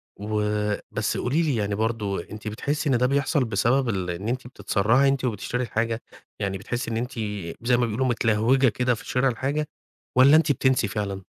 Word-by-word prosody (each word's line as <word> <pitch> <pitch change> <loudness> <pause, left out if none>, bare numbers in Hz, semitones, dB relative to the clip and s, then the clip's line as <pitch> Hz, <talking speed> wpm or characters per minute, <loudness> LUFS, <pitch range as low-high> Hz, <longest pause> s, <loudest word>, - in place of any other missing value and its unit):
و 105 0 -1 0.2
بس - - -1
قولي 140 +7 +1
لي 150 -6 +1
يعني 105 -2 -1
برضه 105 -4 -1
أنتِ 110 0 -8
بتحسي 145 +7 -2
إن 130 - +3
ده 125 - +2
بيحصل 140 +1 +1
بسبب 120 +3 +1
ال 95 -4 -2
إن 90 +4 -4
أنتِ 125 +1 -2
بتتسرّعي 125 +2 +2
أنتِ 135 -1 0
وبتشتري 125 +2 -2
الحاجة؟ 115 0 -1 0.4
يعني 100 -2 -2
بتحسّي 120 +5 -4
إن 110 - -1
أنتِ 125 +3 -3 0.6
زي 125 - +4
ما 120 - +2
بيقولوا 115 +4 -1
متلهوجة 120 +2 +3
كده 125 +1 +1
في - - -12
شِرا 125 +1 +2
الحاجة، 140 +5 -2 0.5
والّا 135 +4 +7
أنتِ 155 -2 +4
بتنسي 130 -4 +2
فعلًا؟ 100 -2 -4
120 Hz, 185 wpm, -25 LUFS, 105-130 Hz, 0.6 s, والّا